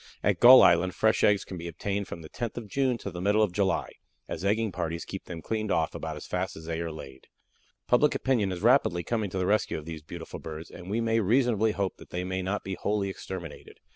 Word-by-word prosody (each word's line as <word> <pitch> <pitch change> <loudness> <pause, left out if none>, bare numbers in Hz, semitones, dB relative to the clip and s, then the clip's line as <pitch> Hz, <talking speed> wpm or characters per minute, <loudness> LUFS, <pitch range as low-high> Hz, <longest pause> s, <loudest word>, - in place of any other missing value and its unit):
At - - +2
Gull 130 +2 +10
Island 85 +1 +4
fresh 110 0 +2
eggs 100 -1 +4
can 95 - -7
be 85 0 -6
obtained 100 +4 -3
from 85 - -8
the 80 - -10
10th 120 -1 -4
of 115 -3 -5
June 130 +2 0
to 100 - -6
the 90 +1 -6
middle 105 +3 +3
of 105 - +1
July, 95 +1 0 0.4
as 80 - -5
egging 110 +2 +1
parties 85 -1 -3
keep 95 - -7
them 85 -3 -8
cleaned 110 +2 -2
off - - +1
about 80 -1 -5
as 75 - -8
fast 90 0 -3
as 80 - -10
they 80 0 -3
are 85 -1 -3
laid. 65 -4 -11 0.6
Public 145 +5 +3
opinion 115 -8 +1
is 90 +1 -5
rapidly 115 -8 +4
coming 110 +1 -1
to 95 - -5
the 90 - 0
rescue 105 +3 +1
of 75 - -8
these 80 -1 -7
beautiful 80 +2 -8
birds, 80 +1 -8
and 90 - -10
we 110 +3 0
may 115 0 +2
reasonably 110 0 +2
hope 100 -3 -2
that - - -14
they 90 +1 -3
may 95 +1 -2
not 95 +3 -2
be 95 - -4
wholly 100 +1 -1
exterminated. 95 -4 -8
95 Hz, 240 wpm, -28 LUFS, 85-110 Hz, 0.6 s, Gull